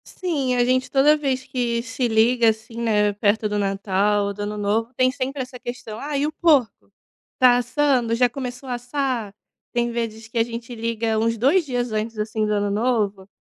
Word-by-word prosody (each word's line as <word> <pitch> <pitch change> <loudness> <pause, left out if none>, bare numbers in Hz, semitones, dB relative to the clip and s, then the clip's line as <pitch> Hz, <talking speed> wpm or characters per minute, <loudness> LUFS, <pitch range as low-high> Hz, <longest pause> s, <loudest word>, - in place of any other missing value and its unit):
Sim, 285 -9 -2
a 245 -1 +3
gente 255 +1 +1
toda 285 +2 +5
vez 270 -4 -1
que 240 -3 -2
se 240 +1 -2
liga, 230 +1 +4
assim, 220 +2 -4
né, 210 -3 +2
perto 210 +1 +1
do 210 0 -1
Natal 200 +1 +1
ou 200 - -3
do 205 - -8
Ano 210 +1 -3
Novo, 215 +3 0
tem 255 0 +3
sempre 265 +1 -3
essa 250 0 -11
questão: 240 -3 -7
"Ah, 290 0 -3
e 280 - +1
o 305 - -1
porco? 300 -7 +1 0.5
Tá 250 -1 +6
assando? 250 -1 +1
Já 245 +1 +3
começou 250 +1 -6
assar?". 245 -3 -2 0.4
Tem 240 0 +1
vezes 225 -2 -4
que 230 - -7
a 225 - +4
gente 235 +1 -7
liga 225 -1 -1
uns 230 +1 +1
2 285 - +3
dias 245 -3 -2
antes, 215 +1 -3
assim, 215 0 -1
do 210 - 0
Ano 205 0 0
Novo, 205 -3 0
235 Hz, 195 wpm, -22 LUFS, 215-255 Hz, 0.5 s, Tá